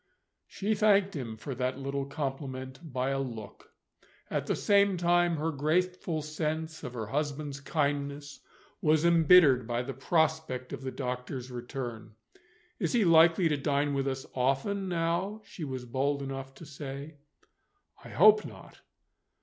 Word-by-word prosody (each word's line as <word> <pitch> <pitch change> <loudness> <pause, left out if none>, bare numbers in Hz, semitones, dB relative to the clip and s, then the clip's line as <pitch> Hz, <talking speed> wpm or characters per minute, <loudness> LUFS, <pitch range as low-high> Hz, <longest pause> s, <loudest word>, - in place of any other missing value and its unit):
She 210 +2 -1
thanked 200 -2 +3
him 115 -6 -5
for 135 +5 -6
that 125 +1 -2
little 140 0 -3
compliment 135 -2 -5
by 130 +1 -1
a 135 - 0
look. 115 -6 -7 0.6
At - - -1
the - - +1
same 200 -2 +3
time, 175 0 +3
her 160 +2 -1
grateful 160 +2 0
sense 155 +1 -3
of 125 - -6
her 110 -2 -3
husband's 145 +3 -3
kindness 145 -1 -2 0.4
was 155 +1 +3
embittered 165 -7 +6
by 120 0 -1
the 135 +2 -5
prospect 155 -2 0
of - - -6
the 130 - -4
doctor's 125 0 -5
return. 120 -3 -6 0.6
"Is - - -1
he 230 -4 +3
likely 165 +1 +6
to 150 - +1
dine 140 0 0
with 135 0 0
us 135 0 -3
often, 135 +10 0
now?" 175 +5 -1
she 180 - -9
was 130 -3 -5
bold 140 +3 -1
enough 135 0 -6
to 165 - -11
say. 140 +1 -8 0.9
"I - - -10
hope 215 +4 +6
not." - - -12
145 Hz, 150 wpm, -30 LUFS, 130-165 Hz, 0.9 s, embittered